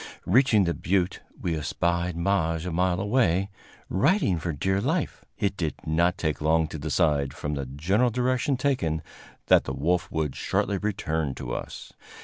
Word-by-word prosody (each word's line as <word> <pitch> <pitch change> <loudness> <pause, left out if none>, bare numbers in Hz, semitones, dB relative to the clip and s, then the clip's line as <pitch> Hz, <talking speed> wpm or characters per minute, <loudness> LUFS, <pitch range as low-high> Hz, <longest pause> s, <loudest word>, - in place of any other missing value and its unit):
Reaching 110 0 +4
the 85 -1 +1
butte, 90 0 0 0.2
we 85 -2 -1
espied 85 +3 -1
Maje 85 -2 0
a 90 - -3
mile 90 +1 +1
away, 100 -3 +1 0.4
riding 100 - +2
for 85 +2 -2
dear 95 +7 0
life. - - -1
It 100 -1 0
did 80 -5 -2
not 85 +3 +2
take 80 -2 -2
long 80 +1 +3
to 80 - -6
decide, 75 -2 +1
from 75 - -3
the 70 -2 -3
general 95 - +1
direction 125 +3 0
taken, 100 - 0 0.4
that - - +5
the 65 - -3
wolf 90 +6 0
would 80 -4 -1
shortly 100 -2 0
return 80 -9 -2
to - - -5
us. - - -7
85 Hz, 160 wpm, -26 LUFS, 80-100 Hz, 0.4 s, that